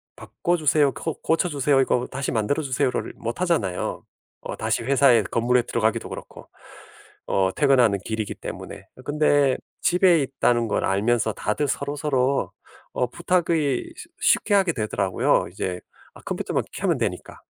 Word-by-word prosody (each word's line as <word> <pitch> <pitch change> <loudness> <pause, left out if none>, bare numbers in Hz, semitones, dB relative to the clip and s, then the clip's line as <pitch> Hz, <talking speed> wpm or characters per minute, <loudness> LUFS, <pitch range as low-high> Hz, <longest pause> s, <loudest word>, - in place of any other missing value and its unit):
"바꿔 175 +1 -2
주세요, 150 -2 +3
고 160 - -4
고쳐 165 +2 +1
주세요, 140 -2 +2
이거 125 -1 +1
다시 135 +1 -3
만들어 115 +7 0
주세요."를 130 -1 -1
못 115 +7 -5
하잖아요. 170 - -1 0.4
어 - - -6
다시 - - -1
회사에 130 -3 +4
건물에 120 +5 +1
들어가기도 110 -2 -1
그렇고. - - -10 0.8
어 95 -1 +1
퇴근하는 125 -8 +4
길이기 110 -2 -3
때문에. - - -8
어 - - -12
근데 145 -2 +2 0.2
집에 175 -2 +4
있다는 120 -3 +1
걸 - - -1
알면서 110 +3 +1
다들 125 +10 -1
서로서로 140 -1 -1 0.4
어 125 - 0
부탁이 165 -5 0
쉬 340 - -11 0.2
쉽게 205 - -1
하게 190 -4 +3
되더라고요. 100 -5 0
이제 90 -1 -4 0.3
아 - - -15
컴퓨터만 - - -2
켜면 - - 0
되니까. - - -4
135 Hz, 340 characters per minute, -24 LUFS, 115-150 Hz, 0.8 s, 회사에